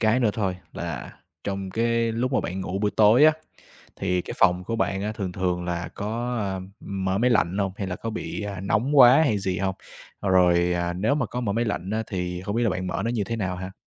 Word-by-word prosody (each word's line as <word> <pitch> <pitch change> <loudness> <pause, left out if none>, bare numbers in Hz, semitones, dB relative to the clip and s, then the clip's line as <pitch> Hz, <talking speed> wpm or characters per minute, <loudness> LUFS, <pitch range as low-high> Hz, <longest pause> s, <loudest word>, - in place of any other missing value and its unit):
cái 110 +3 +3
nữa 115 -4 +3
thôi 95 -4 -1 0.2
là - - -5 0.3
trong 95 -1 -3
cái 115 +1 +1
lúc 125 +4 -1
mà 130 - +3
bạn 90 +3 -4
ngủ 95 +1 -3
buổi 105 0 +1
tối 110 +7 +6
á, 155 - +7 0.6
thì 90 -2 0
cái - - -7
phòng 90 +1 +3
của 115 - -2
bạn 95 -3 0
á 105 +1 -2
thường 100 -5 -4
thường 90 -1 -1
là 85 0 -3
có, 120 +4 -3
a, 100 -2 -2
ưm, 95 0 -7 0.3
mở 95 +1 +1
máy 125 +2 +3
lạnh 100 -5 +2
hông 100 -2 0
hay 100 - -3
là 90 0 -3
có 115 - -5
bị, 110 -1 -5
à, 100 -2 -5
nóng 110 +9 0
quá 130 +4 +8
hay 110 -8 +1
gì 95 -1 -2
hông? 95 0 -1 0.5
Rồi, 90 -2 +4
à, 85 0 -1
nếu 100 +10 +1
mà 145 -5 0
có 125 - -4
mở 110 -5 -1
máy 115 +3 0
lạnh 100 -4 -3
á 110 +1 0
thì 90 -2 -3
không 100 +2 -3
biết 120 - +1
là 115 - +2
bạn 90 0 -3
mở 90 - -2
nó 115 - 0
như 115 -4 -1
thế 115 +3 -3
nào 95 -4 -2
ha? 95 +1 -6
100 Hz, 255 wpm, -25 LUFS, 95-115 Hz, 0.6 s, quá